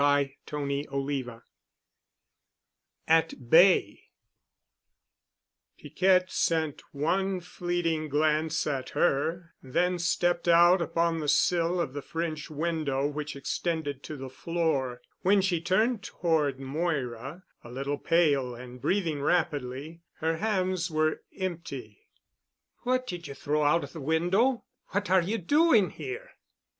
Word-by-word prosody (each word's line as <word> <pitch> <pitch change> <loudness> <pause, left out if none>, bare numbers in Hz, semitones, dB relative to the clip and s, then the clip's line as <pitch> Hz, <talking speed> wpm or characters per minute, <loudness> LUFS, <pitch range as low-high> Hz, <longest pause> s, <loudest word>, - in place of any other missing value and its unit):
*CHAPTER 145 0 0 0.3
XVIII* 135 -4 -3 1.7
*AT 160 -6 +1
BAY* 180 +3 +5 1.8
Piquette 185 -1 +2
sent 160 -3 0
one 185 +6 0
fleeting 175 -3 -2
glance 155 +2 +1
at 135 -3 -2
her, 165 +2 0
then 175 +7 0
stepped 175 0 +1
out 175 +2 +6
upon 165 0 0
the 150 - -3
sill 170 +4 +2
of 135 -6 -2
the 145 - -4
French 160 0 -4
window 155 -3 -1
which 150 0 -3
extended 145 0 -3
to 150 - -7
the 135 0 -6
floor. 145 -6 -1 0.2
When 200 +2 +4
she 185 -4 +1
turned 215 +6 +1
toward 155 -7 0
Moira, 135 0 -3 0.2
a 120 - -11
little 140 +3 -3
pale 140 -7 +2
and 125 +1 -10
breathing 160 -1 0
rapidly, 150 -1 -1
her 160 +1 -1
hands 185 -3 0
were 155 0 0 0.2
empty. 165 - -6 0.7
"What 255 +1 0
did 175 -9 -6
you 140 - -8
throw 150 +2 -1
out 150 +3 +3
of - - -9
the 160 - -7
window? 180 - +2 0.2
What 200 0 -2
are 190 -1 +6
you 205 +7 -1
doing 235 - +4
here?" 465 +6 -7
160 Hz, 120 wpm, -28 LUFS, 145-180 Hz, 1.8 s, out